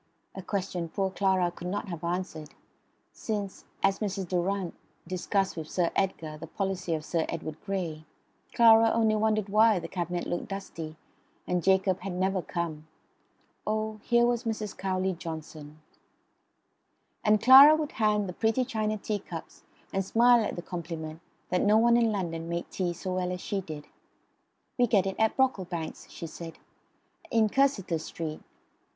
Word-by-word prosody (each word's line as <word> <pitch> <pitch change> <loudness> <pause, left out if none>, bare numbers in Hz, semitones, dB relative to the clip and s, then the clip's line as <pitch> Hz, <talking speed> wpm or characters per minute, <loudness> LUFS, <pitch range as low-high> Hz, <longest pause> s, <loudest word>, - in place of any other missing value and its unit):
a 190 - -7
question 180 -3 -3
poor 190 +2 -1
Clara 190 -2 +2
could 175 - -8
not 205 +3 -3
have 170 -2 -6
answered, 170 -3 -4 0.6
since, 205 -3 -4 0.2
as 195 0 +3
Mrs. 195 -3 -2
Durrant 185 +1 -1 0.3
discussed 190 +2 -1
with 160 -2 -6
Sir 175 -2 0
Edgar 160 -5 -1
the 165 - -8
policy 185 -1 -2
of 155 -1 -5
Sir 165 -1 0
Edward 155 0 -5
Grey, 175 -6 -3 0.5
Clara 225 -1 +7
only 220 -1 +3
wondered 215 -1 +1
why 215 +1 +5
the 175 - -4
cabinet 175 -1 -3
looked 175 - -3
dusty, 165 -5 -6 0.5
and 180 0 0
Jacob 190 -1 +3
had 190 0 -5
never 190 +1 0
come. 160 -3 -4 0.8
Oh, 215 0 -1
here 235 +1 +3
was 240 -1 +1
Mrs. 215 -3 -3
Cowley 190 0 -1
Johnson... 155 -2 -8 1.4
And 210 -1 +4
Clara 270 +6 +10
would 310 -2 -3
hand 210 -2 +1
the 180 - -5
pretty 225 +6 +1
china 215 -3 -1
teacups, 200 -5 -6 0.3
and 195 - +1
smile 235 +4 +5
at - - -3
the 175 - -6
compliment 165 -3 -6 0.3
that 180 - +2
no 210 +1 +5
one 235 +1 +5
in 230 -2 +3
London 165 -5 -3
made 170 0 -3
tea 180 -2 -1
so 185 +2 -4
well 180 0 -1
as 180 - -4
she 200 -1 -2
did. 155 -4 -8 0.9
"We 245 - +5
get 200 -4 +3
it 190 0 -3
at 220 0 +2
Brocklebank's," 185 -11 -1
she - - -7
said, 165 0 -8 0.7
"in 220 -2 +3
Cursitor 215 - +1
Street." 155 0 -6
190 Hz, 160 wpm, -28 LUFS, 170-215 Hz, 1.4 s, Clara